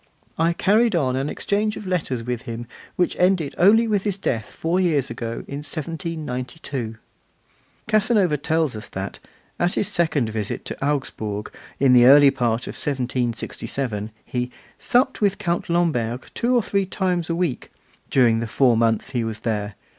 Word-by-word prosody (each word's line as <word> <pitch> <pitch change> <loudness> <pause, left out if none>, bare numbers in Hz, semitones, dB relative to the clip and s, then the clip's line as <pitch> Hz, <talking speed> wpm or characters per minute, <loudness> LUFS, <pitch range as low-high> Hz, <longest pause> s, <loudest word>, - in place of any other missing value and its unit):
I 165 +1 +2
carried 215 +4 +3
on 130 -6 +1
an 135 +3 -1
exchange 210 +1 -1
of - - -8
letters 155 -10 -1
with 120 -1 -3
him 115 +1 -5 0.3
which 180 - +1
ended 180 -5 +2
only 220 +6 +6
with 210 -3 +1
his 200 -1 -2
death 115 - -2
four 170 +3 -1
years 150 -8 +1
ago 115 0 -5
in 140 - -5
1792. 150 - -5 0.9
Casanova 215 -6 +3
tells 155 -2 0
us 110 +1 -7
that, 95 +1 -5 0.4
at 175 +1 +1
his 200 - +1
second 150 -9 +1
visit 110 -2 -4
to - - -5
Augsburg 110 -7 -2 0.3
in 135 -2 +5
the 120 -1 +7
early 140 +1 +8
part 120 -1 0
of - - -6
1767, 125 -3 -2 0.2
he 125 0 -2 0.3
'supped 255 +1 +2
with 200 -2 +2
Count 175 -5 -2
Lamberg 130 -9 0
two 245 +2 +1
or 240 - +3
three 200 -1 0
times 180 -3 -1
a 165 - 0
week,' 170 -7 -2 0.4
during 120 -4 +4
the 115 - -3
four 125 +1 +3
months 115 -1 +1
he 120 -3 0
was 110 -1 -4
there. 105 -3 -2
145 Hz, 160 wpm, -23 LUFS, 120-180 Hz, 0.9 s, early